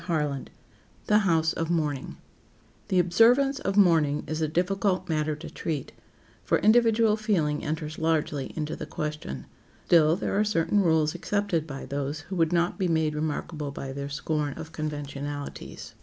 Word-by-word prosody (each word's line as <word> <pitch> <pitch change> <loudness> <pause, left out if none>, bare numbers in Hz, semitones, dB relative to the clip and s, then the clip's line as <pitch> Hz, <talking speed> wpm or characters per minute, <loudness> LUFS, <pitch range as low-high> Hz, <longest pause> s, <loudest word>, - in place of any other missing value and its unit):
CHAPTER 160 -4 +1
XXI 140 -1 -5 0.6
THE 210 - +4
HOUSE 165 -5 +2
OF 165 0 -3
MOURNING 150 -5 -1 0.7
THE 185 - +1
observance 235 +10 +4
of 195 -8 -2
mourning 160 -7 +4
is 155 +1 -3
a 155 - +2
difficult 185 +3 0
matter 155 -1 0
to 150 - -9
treat, 150 -5 -4 0.5
for - - +2
individual 225 0 +4
feeling 175 -9 0
enters 155 0 -4
largely 155 -3 0
into 155 0 -3
the - - -7
question. 150 - -5 0.4
Still, 160 -2 +5
there 190 - -2
are - - +4
certain 205 -1 +1
rules 160 -4 +2
accepted 180 -2 -1
by 135 -2 -6
those 140 +2 -3
who 190 - -7
would 165 -2 +2
not 175 +3 +1
be 185 - +1
made 160 -2 +1
remarkable 150 0 -3
by 135 -1 -6
their 140 +1 -5
scorn 145 0 -2
of 160 0 -8
conventionalities. 145 -2 -6
160 Hz, 160 wpm, -27 LUFS, 150-185 Hz, 0.7 s, Still